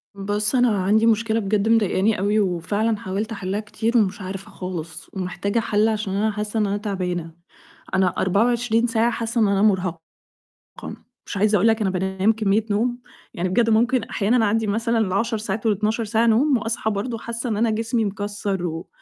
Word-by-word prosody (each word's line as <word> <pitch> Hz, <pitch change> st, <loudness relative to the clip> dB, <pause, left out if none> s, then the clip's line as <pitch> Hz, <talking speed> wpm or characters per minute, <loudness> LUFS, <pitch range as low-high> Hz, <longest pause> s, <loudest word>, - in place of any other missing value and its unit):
بُصّ، 205 Hz, +4 st, -1 dB
أنا 250 Hz, -1 st, +4 dB
عندي 215 Hz, +4 st, +3 dB
مشكلة 225 Hz, 0 st, +2 dB
بجد 210 Hz, +1 st, 0 dB
مضايقاني 215 Hz, -2 st, +2 dB
أوي، 205 Hz, +2 st, +2 dB
وفعلاً 205 Hz, +4 st, 0 dB
حاولت 205 Hz, +3 st, -4 dB
أحِلّها 200 Hz, -1 st, -3 dB
كتير 225 Hz, +2 st, -1 dB
ومش 205 Hz, -1 st, +1 dB
عارفة 190 Hz, +1 st, -7 dB
خالص، 165 Hz, -3 st, -7 dB
ومحتاجة 195 Hz, +3 st, -2 dB
حَلّ 215 Hz, 0 st, +2 dB
عشان 210 Hz, -3 st, -2 dB
أنا 215 Hz, +2 st, +1 dB
حاسة 210 Hz, +1 st, -3 dB
إن 210 Hz, -, +2 dB
أنا 200 Hz, +1 st, -1 dB
تعبانة، 180 Hz, -5 st, -3 dB, 0.6 s
أنا 190 Hz, -1 st, +3 dB
24 230 Hz, +4 st, +2 dB
ساعة 230 Hz, 0 st, +1 dB
حاسة 230 Hz, 0 st, -1 dB
إن 215 Hz, -, +4 dB
أنا 200 Hz, 0 st, +1 dB
مرهقة، 185 Hz, -5 st, +1 dB, 1.3 s
مش -, -, -5 dB
عايزة 210 Hz, +2 st, +3 dB
أقول 205 Hz, +3 st, +3 dB
لك 225 Hz, 0 st, +2 dB
أنا 200 Hz, -, +1 dB
بانام 190 Hz, +2 st, +1 dB
كمية 215 Hz, 0 st, +1 dB
نوم، 240 Hz, +4 st, 0 dB, 0.3 s
يعني 185 Hz, -3 st, -2 dB
بجد 230 Hz, +5 st, +2 dB
ممكن 235 Hz, +2 st, +3 dB
أحيانًا 225 Hz, +2 st, +1 dB
أعدّي 220 Hz, +1 st, +1 dB
مثلًا 230 Hz, +3 st, 0 dB
ال10 220 Hz, +2 st, 0 dB
ساعات 215 Hz, +1 st, -4 dB
وال12 215 Hz, +2 st, +1 dB
ساعة 225 Hz, +2 st, +1 dB
نوم، 255 Hz, +5 st, +4 dB
وأصحى 225 Hz, 0 st, -2 dB
برضه 215 Hz, +4 st, -3 dB
حاسة 235 Hz, +2 st, -5 dB
إن 215 Hz, -, -1 dB
أنا 230 Hz, +2 st, +2 dB
جسمي 225 Hz, +1 st, 0 dB
مكسّر 205 Hz, -2 st, -3 dB
و 165 Hz, +1 st, -5 dB
210 Hz, 175 wpm, -22 LUFS, 195-225 Hz, 1.3 s, أنا